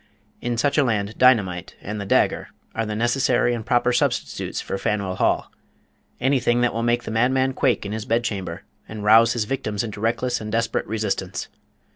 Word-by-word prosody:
in 120 -1 -2
such 145 +5 +2
a - - +5
land 105 -4 -1
dynamite 100 -9 +3
and 105 +1 -5
the 100 - -6
dagger - - +2 0.3
are 115 -1 -2
the 105 - -3
necessary 120 +1 +2
and 115 -3 -5
proper 125 0 +2
substitutes - - -1
for 95 - -4
Faneuil 100 -3 -1
Hall. - - +1 0.7
Anything 120 -2 +2
that 120 - +2
will 115 - -2
make 120 +1 +1
the - - -6
madman 130 +4 +2
quake 130 -5 +1
in 100 - -4
his 110 0 -4
bedchamber, 110 -8 -2 0.3
and 110 -1 -6
rouse 115 +2 +6
his 120 - 0
victims 105 -4 -2
into 105 -2 -6
reckless 120 +2 0
and 105 0 -5
desperate 115 +1 -1
resistance. 100 -4 -3
115 Hz, 180 wpm, -23 LUFS, 105-120 Hz, 0.7 s, rouse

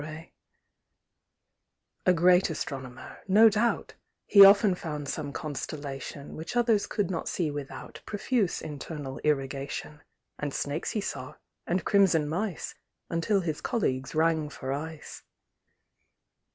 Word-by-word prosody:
A - - +8
great 180 +2 +5
Astronomer, 130 -5 -6
no 215 +4 +7
doubt, 220 +2 0 0.3
He 200 -1 +9
often 200 0 +7
found 150 -5 -5
some 145 0 -3
Constellation 145 -1 -6
Which 165 +10 -6
others 230 -4 +3
could 200 -4 -1
not 165 - -3
see 165 -5 -1
without 145 -2 -7
Profuse 210 -2 0
internal 145 -2 -6
irrigation; 140 +1 -2 0.4
And 145 -2 -3
snakes 145 +3 -2
he 215 - -1
saw, - - -5 0.3
and 180 +2 0
crimson 190 -7 +4
mice, 180 +3 -3 0.4
Until 180 +4 +1
his 160 -4 -3
colleagues 135 - -1
rang 160 -1 +2
for 135 -2 -4
ice. 155 +2 -7
160 Hz, 115 wpm, -28 LUFS, 145-195 Hz, 0.4 s, He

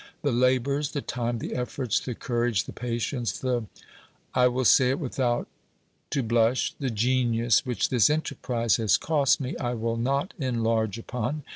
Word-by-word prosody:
The 145 - +1
labours, 130 +4 +1
the 145 - -3
time, 120 -1 -2
the - - -5
efforts, 125 -1 -1
the 125 - -5
courage, 120 -4 0
the - - -9
patience, 120 0 -3
the 125 -3 -1 0.7
I 125 0 +4
will 125 +1 -1
say 125 +2 +6
it 135 - 0
without 125 -4 -1 0.6
to 135 - 0
blush 115 +2 +2
the 135 -3 -1
genius 120 +1 +2
which 125 - 0
this 120 -3 +4
enterprise 125 -6 0
has 110 -4 +3
cost 145 -4 +2
me, 130 -2 -4
I 120 -1 -2
will 115 0 -2
not 140 +9 -1
enlarge 115 -5 0
upon. 125 +5 -4
125 Hz, 160 wpm, -26 LUFS, 115-130 Hz, 0.7 s, say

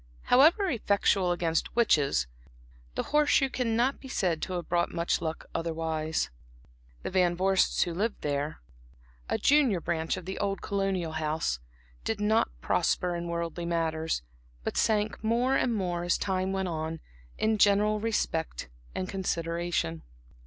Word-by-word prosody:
However 320 - +5
effectual 200 - +2
against 165 -2 -1
witches, 145 - +3 0.7
the - - -1
horse 300 0 +4
shoe 270 -1 +3
cannot 245 +2 +1
be 270 - -10
said 180 -10 0
to 185 - -3
have 175 -1 -3
brought 175 0 +1
much 170 0 0
luck 160 -1 -4
otherwise. 160 - -1 0.7
The - - -3
Van 180 -2 +2
Vorsts 190 +1 +3
who 175 - -4
lived 210 +6 -2
there, 145 +1 -2 0.7
a - - +1
junior 275 -10 +4
branch 165 -1 -1
of 185 - -8
the 190 +1 -5
old 195 -1 -1
colonial 195 -4 -1
house, 155 - -1 0.4
did 220 - -2
not 215 +2 +2
prosper 180 -1 +1
in 170 0 -4
worldly 170 0 -3
matters, 160 - -1 0.4
but - - -3
sank 215 0 +1
more 240 +4 +2
and 250 - +2
more 180 -5 -1
as 175 - +2
time 190 -1 -1
went 190 -1 -1
on, 160 -1 -3 0.4
in 220 -1 +1
general 210 +1 +4
respect 165 - -2 0.3
and 185 - -2
consideration. 170 - -2
180 Hz, 145 wpm, -29 LUFS, 165-210 Hz, 0.7 s, However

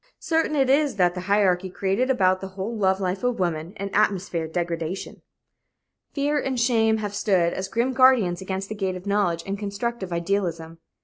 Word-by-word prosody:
Certain 325 -2 0
it 270 -2 +3
is 280 +1 +2
that 180 -2 +3
the 180 - -5
hierarchy 190 -2 +2
created 195 +7 -1
about 185 -7 +2
the 195 - -5
whole 195 +4 -5
love 190 -3 +1
life 190 +1 -2
of 245 -1 0
woman 170 -2 -1
an 200 0 -5
atmosphere 190 -5 +1
of 160 - -10
degradation. 170 +1 -4 0.9
Fear 290 +1 0
and 265 -3 -2
shame 225 -2 +3
have 205 -2 -4
stood 185 -5 +1
as 190 - -3
grim 235 +6 0
guardians 245 -9 +4
against 190 +1 -4
the 215 - -5
gate 190 -3 -2
of 185 +1 -9
knowledge 200 -5 0
and 195 0 -4
constructive 205 -1 -4
idealism. 170 -2 -2
195 Hz, 185 wpm, -24 LUFS, 180-230 Hz, 0.9 s, guardians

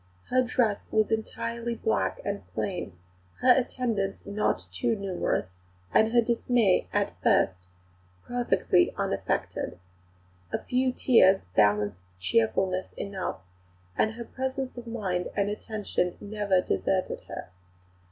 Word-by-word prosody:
Her 255 - +5
dress 245 -4 0
was 215 0 +2
entirely 230 +1 -2
black 220 - 0
and 200 0 -2
plain; 180 - -2 0.5
her 255 - +6
attendants 240 -6 0
not 200 - 0
too 90 - 0
numerous; 180 - -2 0.3
her 225 +2 +5
dismay 235 -3 +2
at - - -1
first 90 -1 +2 0.6
perfectly 235 - +2
unaffected. - - -2 0.7
A - - +1
few 255 +1 0
tears 195 -7 +5
balanced 105 -3 +3 0.2
cheerfulness 115 - +1
enough, 195 - -4 0.5
and 220 - +2
her 235 +1 -7
presence 265 +1 -3
of 240 -1 -8
mind 190 -6 -2
and 200 0 +2
attention 210 -4 -2
never 205 -3 +1
deserted 185 0 -1
her. - - -7
205 Hz, 115 wpm, -28 LUFS, 185-235 Hz, 0.7 s, her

